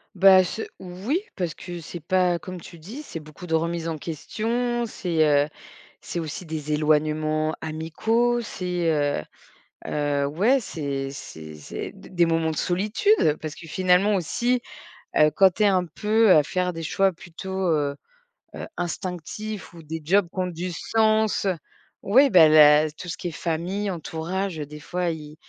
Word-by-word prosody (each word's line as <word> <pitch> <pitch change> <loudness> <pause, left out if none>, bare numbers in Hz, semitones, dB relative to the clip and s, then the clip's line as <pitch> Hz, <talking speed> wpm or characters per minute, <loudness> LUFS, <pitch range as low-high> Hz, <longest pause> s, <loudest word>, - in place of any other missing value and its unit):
Bah, 190 0 +7
ce 200 +5 -4 0.2
oui, 190 - -2 0.2
parce 175 -3 -3
que 175 -1 -7
c'est 175 - -8
pas 180 +1 +2
comme 185 0 -8
tu 170 - -12
dis, 210 - -9
c'est 170 - -7
beaucoup 155 +3 -11
de 160 - +1
remise 165 +1 -1
en 160 - -2
question, 230 - -2
c'est, 170 -7 0
heu, 145 0 +3 0.5
c'est 175 - -5
aussi 165 +2 -5
des 155 -1 -4
éloignements 155 +1 +1
amicaux, 220 +10 0
c'est, 180 -6 -2
heu 145 - +1 0.7
heu, 145 -1 0
ouais, 205 - +3
c'est 140 -8 -4
c'est 80 - -9
c'est 75 - -7
des - - -14
des 175 -2 +2
moments 165 -1 +1
de 155 - -4
solitude, 210 - +1
heu, 150 -1 +3
parce 155 -1 -6
que 165 - -12
finalement 185 +4 +3
aussi, 240 +7 0 0.6
heu, 150 0 +6
quand 195 -1 +7
tu 215 - +1
es - - +6
un 185 -3 +3
peu, 215 +6 +2
heu, - - +8
à 150 - +6
faire 180 +3 -1
des 165 - -6
choix 195 +4 +2
plutôt, 190 +2 -5
heu 145 -2 0 0.6
heu, - - -5
instinctifs 185 +4 -5
ou 165 - -12
des 160 +2 -5
jobs 180 +3 +2
qui 190 - -7
ont 185 - +1
du 180 +1 -4
sens, 220 +2 +1 0.6
ouais, 265 +7 +5
bah, 170 -5 +8
la 155 0 +7
tout 165 +4 -10
ce 175 - -4
qui - - -5
est 170 - -3
famille, 180 +6 -2
entourage, 170 +1 -3
heu, 150 - -3
des 150 +1 -10
fois, 175 +3 -2
ils 155 -2 -6
170 Hz, 175 wpm, -24 LUFS, 155-195 Hz, 0.7 s, heu